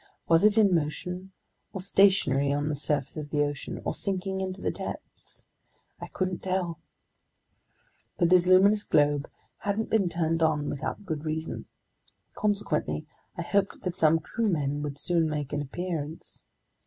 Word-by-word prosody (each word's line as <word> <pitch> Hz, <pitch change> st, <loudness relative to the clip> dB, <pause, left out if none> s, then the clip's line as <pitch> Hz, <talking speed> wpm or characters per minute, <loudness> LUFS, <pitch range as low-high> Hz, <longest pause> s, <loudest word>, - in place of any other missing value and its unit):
Was 165 Hz, +1 st, +5 dB
it 210 Hz, +1 st, +5 dB
in 205 Hz, -4 st, +5 dB
motion, 180 Hz, +4 st, -2 dB, 0.4 s
or 190 Hz, -, -4 dB
stationary 185 Hz, -8 st, +3 dB
on 145 Hz, +1 st, 0 dB
the 150 Hz, -, -1 dB
surface 145 Hz, 0 st, -1 dB
of 150 Hz, -1 st, -5 dB
the 145 Hz, -1 st, +2 dB
ocean, 145 Hz, -1 st, -4 dB
or -, -, 0 dB
sinking 190 Hz, -1 st, -2 dB
into 190 Hz, 0 st, -4 dB
the -, -, -1 dB
depths? -, -, -9 dB, 0.5 s
I -, -, -6 dB
couldn't 185 Hz, -2 st, -2 dB
tell. 185 Hz, -3 st, -2 dB, 1.4 s
But 170 Hz, -, +3 dB
this 180 Hz, -1 st, +6 dB
luminous 200 Hz, +3 st, +6 dB
globe 145 Hz, -1 st, +2 dB, 0.3 s
hadn't 205 Hz, +2 st, -2 dB
been 200 Hz, -5 st, +3 dB
turned 165 Hz, -1 st, 0 dB
on 150 Hz, -2 st, +1 dB
without 145 Hz, +8 st, -4 dB
good 155 Hz, -4 st, -3 dB
reason. 160 Hz, +1 st, -4 dB, 0.7 s
Consequently, 205 Hz, -1 st, -1 dB, 0.3 s
I -, -, -2 dB
hoped 200 Hz, -1 st, 0 dB
that 180 Hz, -2 st, -2 dB
some 160 Hz, -2 st, +4 dB
crewmen 155 Hz, -, -1 dB
would 145 Hz, -1 st, -4 dB
soon 165 Hz, +1 st, +1 dB
make 150 Hz, -2 st, -3 dB
an 145 Hz, -, 0 dB
appearance. 160 Hz, +1 st, -5 dB
165 Hz, 150 wpm, -28 LUFS, 150-190 Hz, 1.4 s, this